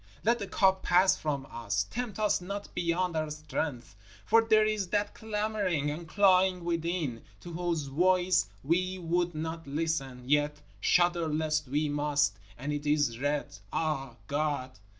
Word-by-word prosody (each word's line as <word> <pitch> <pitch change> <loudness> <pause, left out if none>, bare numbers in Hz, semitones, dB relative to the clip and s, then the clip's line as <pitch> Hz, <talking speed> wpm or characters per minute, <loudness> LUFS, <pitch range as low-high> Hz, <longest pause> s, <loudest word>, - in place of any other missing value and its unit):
Let 235 +3 +3
the 200 - -4
cup 190 -1 +3
pass 185 +2 +4
from 140 -3 -3
us, 100 -4 -1
tempt 240 -4 -4
us 210 -3 +1
not 200 +3 -6
beyond 175 0 0
our 155 -1 -1
strength, 150 -6 -4 0.3
for 225 +1 +5
there 215 -1 +4
is 215 -3 0
that 205 +2 0
clamoring 210 -8 -1
and 165 +3 -6
clawing 185 0 +4
within, 165 -7 -2 0.2
to 175 - -9
whose 170 -2 -1
voice 180 - +2 0.2
we 185 +5 +1
would 175 -1 0
not 160 0 -4
listen, 140 -4 -2
yet 145 +1 +2 0.2
shudder 175 - +3
lest 155 -1 0
we 150 +4 0
must, 145 -8 +1 0.2
and 140 +4 -3
it 145 0 -4
is 145 -6 +2
red, 145 -6 -1 0.2
Ah! 135 -6 -2
God! 145 -3 -1
165 Hz, 150 wpm, -30 LUFS, 145-185 Hz, 0.3 s, for